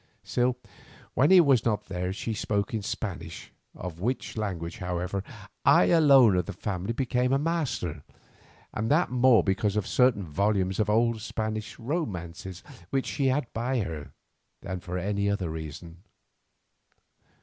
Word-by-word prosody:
Still, 125 Hz, 0 st, 0 dB, 0.6 s
when 140 Hz, +4 st, +3 dB
he 190 Hz, -1 st, +8 dB
was 135 Hz, -8 st, +5 dB
not 105 Hz, -2 st, 0 dB
there 90 Hz, -1 st, -3 dB
she 110 Hz, +3 st, -3 dB
spoke 100 Hz, -1 st, -1 dB
in 110 Hz, -, -1 dB
Spanish, 95 Hz, -5 st, -5 dB, 0.2 s
of 85 Hz, -2 st, -7 dB
which 125 Hz, +7 st, -2 dB
language, 90 Hz, -6 st, -4 dB
however, 90 Hz, +2 st, -3 dB, 0.4 s
I 90 Hz, -, +5 dB
alone 140 Hz, -, +6 dB
of 90 Hz, -, -1 dB
the 100 Hz, -, -4 dB
family 95 Hz, +2 st, -3 dB
became 125 Hz, 0 st, 0 dB
a 135 Hz, -, +4 dB
master—and 125 Hz, -, -4 dB
that 155 Hz, +2 st, +3 dB
more 125 Hz, -2 st, +5 dB
because 100 Hz, +1 st, 0 dB
of 105 Hz, -3 st, 0 dB
certain 125 Hz, -6 st, +3 dB
volumes 95 Hz, +3 st, 0 dB
of 105 Hz, -, +1 dB
old 115 Hz, +1 st, +2 dB
Spanish 110 Hz, +1 st, -4 dB
romances 95 Hz, -, -4 dB, 0.3 s
which 135 Hz, -1 st, 0 dB
she 140 Hz, -2 st, 0 dB
had 130 Hz, +1 st, +1 dB
by 120 Hz, +2 st, 0 dB
her, 80 Hz, -6 st, -6 dB, 0.5 s
than 95 Hz, -1 st, -4 dB
for 90 Hz, +1 st, -5 dB
any 100 Hz, +2 st, 0 dB
other 95 Hz, -5 st, -1 dB
reason. 80 Hz, +2 st, -7 dB
105 Hz, 145 wpm, -27 LUFS, 90-125 Hz, 0.6 s, he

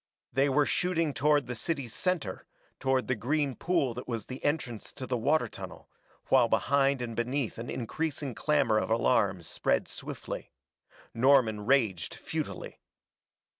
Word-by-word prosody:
They 135 Hz, +3 st, +3 dB
were 145 Hz, +2 st, +3 dB
shooting 165 Hz, -4 st, +1 dB
toward 145 Hz, 0 st, +3 dB
the 125 Hz, -, -4 dB
city's 135 Hz, -1 st, -3 dB
center, 175 Hz, -, -2 dB, 0.3 s
toward 130 Hz, -1 st, +1 dB
the 130 Hz, -, +2 dB
green 140 Hz, +4 st, 0 dB
pool 165 Hz, -9 st, +1 dB
that 125 Hz, +2 st, -7 dB
was 115 Hz, -4 st, -3 dB
the 130 Hz, +1 st, -8 dB
entrance 140 Hz, -7 st, -2 dB
to 135 Hz, -, -6 dB
the 130 Hz, -, -1 dB
water 145 Hz, +7 st, +2 dB
tunnel, -, -, -10 dB, 0.4 s
while -, -, +6 dB
behind 135 Hz, -1 st, +2 dB
and 115 Hz, -2 st, -5 dB
beneath 120 Hz, 0 st, -1 dB
an 120 Hz, -, -5 dB
increasing 140 Hz, +2 st, -3 dB
clamor 125 Hz, -5 st, +2 dB
of -, -, -2 dB
alarm 110 Hz, -5 st, +2 dB
spread -, -, 0 dB
swiftly. -, -, -7 dB, 0.6 s
Norman 115 Hz, -4 st, +4 dB
raged 110 Hz, -11 st, +2 dB
futilely. -, -, -5 dB
130 Hz, 145 wpm, -30 LUFS, 115-145 Hz, 0.6 s, while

